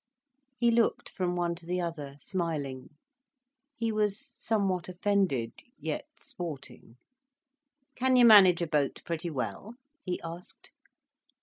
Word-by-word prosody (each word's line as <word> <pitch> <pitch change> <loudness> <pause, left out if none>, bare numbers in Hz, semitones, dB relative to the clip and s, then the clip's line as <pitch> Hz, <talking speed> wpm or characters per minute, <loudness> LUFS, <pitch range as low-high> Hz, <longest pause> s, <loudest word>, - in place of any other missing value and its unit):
He 235 0 +3
looked 230 -1 +1
from 180 -2 -2
one 175 -1 0
to 170 0 -12
the 180 +1 -1
other, 155 -5 -4
smiling. 145 -7 -4 0.8
He 230 -5 -1
was 210 -2 +1
somewhat 210 -9 -2
offended—yet 195 - -2
sporting. 145 -8 -8 1.0
"Can 255 +1 +2
you 245 -1 +7
manage 190 -6 +8
a - - -2
boat 150 -3 0
pretty 170 +1 -3
well?" 140 - -4 0.3
he 180 -2 -3
asked. 170 +2 -9
180 Hz, 115 wpm, -29 LUFS, 160-215 Hz, 1.0 s, manage